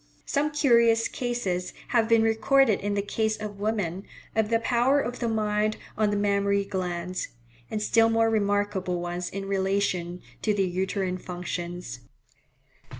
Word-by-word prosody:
Some 295 +1 +1
curious 235 -6 +4
cases 220 -8 -3
have 230 -2 +2
been 230 -1 +5
recorded 225 +1 +3
in 205 0 -2
the 200 - 0
case 220 +1 -1
of 210 -2 -7
women, 200 -4 -1 0.3
of 220 -1 +2
the 230 - +3
power 245 +4 +2
of 245 -2 -3
the 235 - -1
mind 215 -1 0 0.2
on 215 -1 +2
the 205 - 0
mammary 200 0 +1
glands; 180 -2 -3 0.4
and 215 - -2
still 225 +1 +4
more 225 0 +3
remarkable 205 -4 0
ones 175 0 -3
in 195 0 -5
relation 190 -2 -1 0.2
to 210 -2 +1
the 195 -1 +2
uterine 185 0 -2
functions. 175 -3 -5
205 Hz, 150 wpm, -26 LUFS, 185-225 Hz, 0.4 s, been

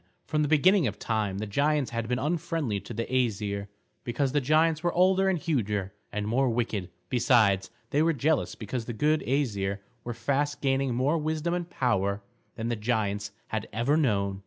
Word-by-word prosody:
From 150 - 0
the 150 - +2
beginning 160 +2 +4
of 105 - -4
time, 105 -4 -1
the 105 - -3
giants 145 +6 +1
had 115 -1 -2
been 125 +1 0
unfriendly 155 - -1
to - - -9
the 115 - -2
Æsir, 105 -5 -1 0.4
because 130 +3 0
the 145 +1 +2
giants 155 +3 +3
were 175 0 +1
older 190 +2 +4
and 190 - +1
huger 105 - -1 0.2
and 105 0 -2
more 130 +4 +2
wicked; 115 -6 -1 0.2
besides, 110 -6 +3 0.2
they 145 - +3
were 165 +1 +4
jealous 150 +1 0
because 115 +2 -4
the 120 - -4
good 150 +7 +2
Æsir 105 -8 0 0.3
were 120 -1 -5
fast 140 +5 0
gaining 135 -2 +1
more 140 +6 +2
wisdom 155 +2 -1
and 175 -1 -3
power 100 - 0 0.3
than 115 0 -3
the 120 - 0
giants 105 -3 -1 0.2
had - - -3
ever 120 +7 +1
known. 100 -10 +1
125 Hz, 180 wpm, -28 LUFS, 105-150 Hz, 0.4 s, beginning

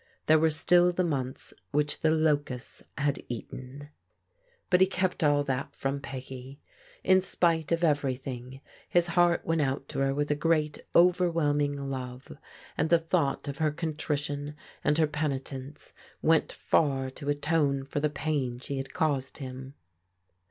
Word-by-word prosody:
There 155 0 +5
were 160 +1 +4
still 175 +3 +4
the 180 +1 0
months 135 -6 -2 0.2
which 150 0 0
the 160 - +3
locusts 145 -5 0 0.2
had 145 -1 0
eaten. 130 +4 -7 0.8
But 180 0 +5
he 190 - +7
kept 185 -2 -1
all 145 -1 +4
that 135 -1 -3
from 135 +1 -2
Peggy. 130 0 -8 0.4
In 185 0 +5
spite 165 -4 +1
of 170 +1 +1
every 145 -5 +2
thing 130 0 -8 0.3
his 175 0 +3
heart 175 0 +3
went 165 -1 +1
out 135 0 -1
to - - -4
her 135 0 +1
with 145 +1 0
a - - +3
great 155 -1 +1 0.2
overwhelm 170 -4 +4
ing 145 0 0
love, 125 -1 -6 0.4
and 160 - 0
the 170 - +6
thought 165 -4 0
of 140 -1 -5
her 155 -1 +3
contrition 150 -2 -3 0.3
and 150 - +2
her 160 - +5
peni 150 -2 -1
tence 135 +2 -9 0.3
went 160 -1 +3
far 135 -4 +1
to 140 +2 -6
atone 145 -2 +1
for 140 - -3
the 150 +1 +1
pain 140 -4 -2
she 140 +2 -5
had 135 0 -6
caused 140 -4 0
him. 130 0 -8
145 Hz, 160 wpm, -29 LUFS, 135-160 Hz, 0.8 s, he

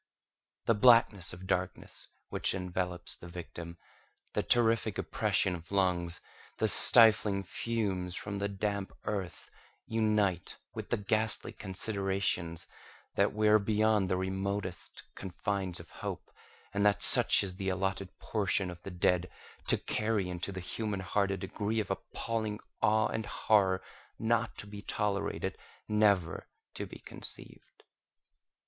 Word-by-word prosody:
The 115 - +4
blackness 110 -4 +5
of 90 +1 -10
darkness - - -3 0.2
which - - -1
envelops 90 -1 -2
the 85 - -11
victim, 85 -1 -8 0.6
the - - +1
terrific 115 -3 +2
oppression 95 - 0
of 85 +1 -8
lungs, 90 -3 +1 0.4
the - - +2
stifling 105 -4 +6
fumes 95 -3 -2
from 100 -1 -4
the 100 0 -1
damp 100 0 -3
earth, 95 -5 -4 0.3
unite 105 -5 0 0.2
with - - -6
the - - +1
ghastly 110 +2 +1
considerations 95 -3 -2 0.5
that - - +2
we 105 0 +1
are 105 0 +6
beyond 105 -1 +2
the 90 - +1
remotest 95 0 -3
confines 95 -1 -3
of - - -13
hope, - - -6 0.4
and 100 0 +1
that 100 -1 +3
such - - +8
is 95 -2 -5
the 95 -1 -2
allotted 95 0 -2
portion 100 -3 -1
of 85 0 -11
the - - -7
dead, 90 0 +1 0.4
to - - +4
carry 105 -4 -1
into 90 +2 -4
the 95 - -5
human 100 +2 -3
heart 100 +2 0
a 95 - -1
degree 105 +3 -2
of 105 - -2
appalling 110 -2 -3 0.2
awe 110 +1 +4
and 110 -1 -3
horror 95 -4 +2 0.3
not 115 0 0
to - - -8
be 100 0 -9
tolerated—never 100 -2 -1 0.3
to - - -5
be - - -10
conceived. - - -10
100 Hz, 135 wpm, -31 LUFS, 90-105 Hz, 0.6 s, such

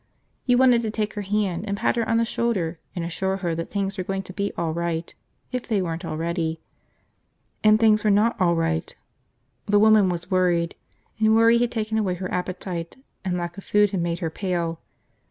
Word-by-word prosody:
You 245 -1 +4
wanted 250 -2 +5
to 225 - -2
take 215 -1 -2
her 210 - -4
hand 200 -2 -1
and 200 0 -2
pat - - +1
her 230 -2 -1
on 225 - +3
the 230 - +2
shoulder 190 -9 -1 0.2
and 170 -2 -2
assure 190 +3 -1
her 175 -3 -2
that 165 +1 -4
things 200 -1 -2
were - - -1
going 195 +1 -3
to 185 - -10
be 200 +1 -2
all 165 -2 -1
right, 170 0 -3 0.4
if 250 -1 -4
they 215 -4 +1
weren't 170 -1 -3
already. 165 0 -2 1.0
And 215 0 +6
things 215 -2 +4
were 215 - +3
not 210 +3 +3
all 170 -2 +4
right. 165 0 -1 0.7
The 205 0 +4
woman 215 -2 +6
was 175 0 -4
worried, 175 -2 +2 0.5
and 220 0 +4
worry 230 +1 +5
had 240 0 +1
taken 220 -1 -1
away 190 -4 0
her 185 +1 -5
appetite, 180 -1 -4 0.3
and 180 -1 -1
lack 175 +2 -4
of - - -11
food 205 -1 +3
had 190 -4 -1
made 170 0 -1
her 160 - -2
pale. 170 -3 -2
190 Hz, 205 wpm, -24 LUFS, 170-215 Hz, 1.0 s, And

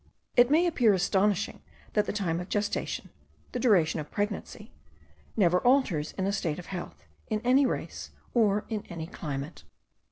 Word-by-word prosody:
It 245 0 +6
may 320 +5 +4
appear 240 - +4
astonishing, 195 +2 +1 0.3
that 210 -1 +2
the - - 0
time 180 -5 -1
of 180 - -6
gestation 205 0 -2 0.4
the 250 - -3
duration 190 -10 +3
of 150 -1 -6
pregnancy, 210 +2 -4 0.7
never 180 -3 +4
alters 235 - +2
in 190 - -2
a 200 - 0
state 165 -6 -1
of 180 - -8
health, 175 - -7 0.2
in 215 - -1
any 260 +3 +4
race, - - -4 0.2
or 210 -3 +3
in 215 -3 -3
any 165 -2 -5
climate. 150 -2 -6
205 Hz, 160 wpm, -28 LUFS, 175-225 Hz, 0.7 s, It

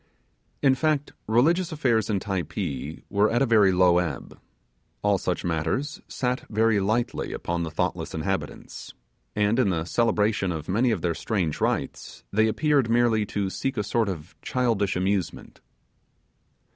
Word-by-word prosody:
In 135 -2 +6
fact 150 +1 0
religious 165 - +3
affairs 125 -9 +1
in 100 -2 +1
Typee 85 - -4
were 105 +1 +2
at 120 +3 +2
a - - +4
very 110 -5 +5
low 90 -1 +4
ebb: 80 -7 -4 0.6
all 100 -2 +3
such 90 0 -2
matters 85 - -2
sat 125 0 -2
very 110 -1 +2
lightly 110 +5 -1
upon 85 0 -3
the 85 - -2
thoughtless 80 - -2
inhabitants; - - -4 0.4
and, 105 +3 +2
in 120 -6 +3
the 85 -3 -1
celebration 105 -2 +1
of 80 -3 -5
many 115 +7 +2
of 105 -8 -1
their 85 -1 +1
strange 90 -4 -2
rites, - - -2
they 110 +2 +4
appeared 140 +1 +2
merely 115 -3 +2
to 100 -1 -2
seek 135 +4 -3
a 105 - +1
sort 115 0 0
of 85 -2 -6
childish 115 -6 0
amusement. 95 -1 -2
105 Hz, 150 wpm, -25 LUFS, 90-120 Hz, 0.6 s, In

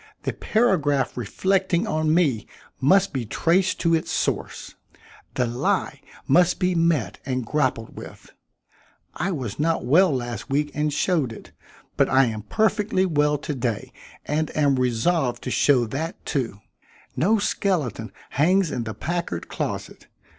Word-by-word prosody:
The - - -2
paragraph 145 - +1
reflecting 185 - 0
on 155 0 0
me 150 -10 +2 0.3
must 195 +7 +3
be 130 -3 -1
traced 175 - +1
to 165 -1 +2
its 160 - 0
source. - - -2 0.6
The 125 - +1
lie 120 +1 -1 0.3
must 175 +5 +4
be 180 -1 +1
met 165 - +1
and 130 -3 -2
grappled 130 -4 -1
with. - - -11 0.8
I 180 +5 -2
was 130 - -4
not 160 -3 0
well 175 +8 +5
last 120 -3 -4
week 145 +2 0
and 150 +1 0
showed 150 -4 0
it, 115 - -11 0.5
but - - +3
I 135 0 +5
am 110 -2 -3
perfectly 210 - +1
well 150 -3 +2
to 150 +1 -4
day 120 -5 -3 0.3
and 155 +1 -1
am 140 -3 +3
resolved 125 +1 0
to 125 - -3
show 130 -3 +3
that, 145 +9 -5
too. 125 -8 -2 0.6
No 210 +7 +3
skeleton 160 - -1 0.2
hangs 180 +4 +2
in 120 - -3
the 110 -2 -5
Packard 170 - -3
closet. - - -5
150 Hz, 145 wpm, -24 LUFS, 125-175 Hz, 0.8 s, well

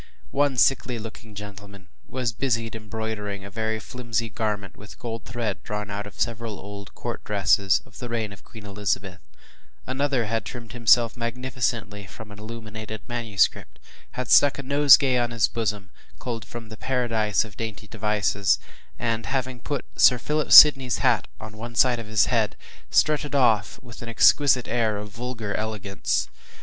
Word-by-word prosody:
One 140 -1 +1
sickly 125 -1 +3
looking 110 -1 -10
gentleman 100 -1 -10 0.2
was 125 -3 -2
busied 115 -3 -1
embroidering 110 -2 -5
a 100 - -9
very 110 +1 -2
flimsy 115 0 -3
garment 105 -3 -3
with 105 +2 -13
gold 115 -3 -6
thread 115 -6 -3
drawn 105 0 -5
out 105 0 -4
of 105 - -14
several 115 -3 -2
old 100 0 -10
court - - -5
dresses 100 -2 +2
of 115 - -15
the 125 - -6
reign 110 -3 -3
of 100 - -16
Queen 110 -3 -13
Elizabeth. 100 -2 -2 0.7
Another 135 -3 0
had 110 0 -1
trimmed 115 +2 -8
himself 115 -1 +3
magnificently 115 -4 -3
from 110 +3 -11
an 105 - -11
illuminated 110 -1 -8
manuscript, 115 -5 0 0.4
had 125 -1 -4
stuck 145 -1 +6
a 140 - -5
nosegay 140 -2 +5
in 120 - -2
his 115 -2 +2
bosom, 105 -4 -3 0.3
culled 115 -4 -5
from 115 -2 -9
“The 110 - -10
Paradise 115 -5 0
of 105 -2 -13
Dainty 110 -1 -6
Devices,” 105 -2 +1 0.4
and 115 -2 -2
having 130 0 -2
put 140 +3 -4
Sir 125 - +6
Philip 150 +5 -2
Sidney’s 135 -5 +9
hat - - +2
on 110 0 -9
one 120 +2 -7
side 125 0 +4
of 115 - -7
his 110 -1 +3
head, 115 -5 0 0.3
strutted 150 -2 +2
off 115 -6 +2
with 120 -2 -12
an 120 - -6
exquisite 125 +2 +4
air 115 -3 0
of 105 +1 -7
vulgar 115 -1 -5
elegance. 105 -3 -2
110 Hz, 160 wpm, -24 LUFS, 105-120 Hz, 0.7 s, Sidney’s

